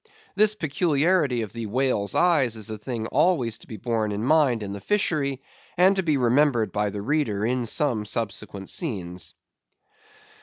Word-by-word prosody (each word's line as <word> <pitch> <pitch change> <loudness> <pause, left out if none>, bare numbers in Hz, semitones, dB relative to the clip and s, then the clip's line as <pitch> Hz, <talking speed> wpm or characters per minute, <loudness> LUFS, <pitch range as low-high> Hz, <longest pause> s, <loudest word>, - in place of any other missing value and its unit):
This 215 +1 +4
peculiarity 150 - +1
of 105 - -8
the 115 -2 -5
whale's 110 -4 0
eyes 150 -10 +3
is 110 0 -4
a 110 - -4
thing 115 0 -4
always 120 -7 +1
to - - -17
be 110 - -8
borne 110 0 -1
in 105 +1 -3
mind 135 -5 +3
in 100 -1 -5
the 100 - -6
fishery; 145 -10 -1 0.3
and 185 +3 +5
to 190 - +1
be 155 -5 +1
remembered 125 -2 +2
by 105 0 0
the 100 0 -6
reader 115 -6 0
in 125 0 -1
some 120 -3 +1
subsequent 100 -2 -4
scenes. 90 - -3
120 Hz, 165 wpm, -25 LUFS, 105-150 Hz, 0.3 s, and